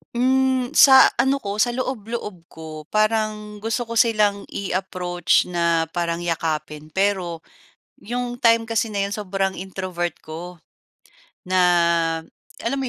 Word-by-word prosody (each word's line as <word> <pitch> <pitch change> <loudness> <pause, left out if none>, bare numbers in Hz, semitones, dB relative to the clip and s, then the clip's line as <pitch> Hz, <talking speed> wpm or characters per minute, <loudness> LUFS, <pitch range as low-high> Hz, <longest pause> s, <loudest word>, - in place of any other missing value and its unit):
Hmm, 260 0 +2
sa 265 -1 +8
ano 275 +1 +2
ko 200 +1 -4
sa 240 +2 +2
loob-loob 225 -8 -5
ko, 155 -2 -10
parang 215 -1 -1
gusto 225 +3 -2
ko 230 -1 -2
silang 210 -4 +2
i-approach 180 -2 0
na 170 -2 +1
parang 170 0 -2
yakapin. 155 -2 -3
Pero, 180 -1 -1 0.6
'yong 245 +2 -4
time 230 -1 +4
kasi 225 0 -1
na 200 -2 -1
'yon 200 - -4
sobrang 195 -2 -2
introvert 185 -2 -4
ko. 170 +3 -8 0.9
Na, 185 0 +1 1.0
alam 270 +4 -1
mo 260 - -2
200 Hz, 125 wpm, -22 LUFS, 175-230 Hz, 1.0 s, sa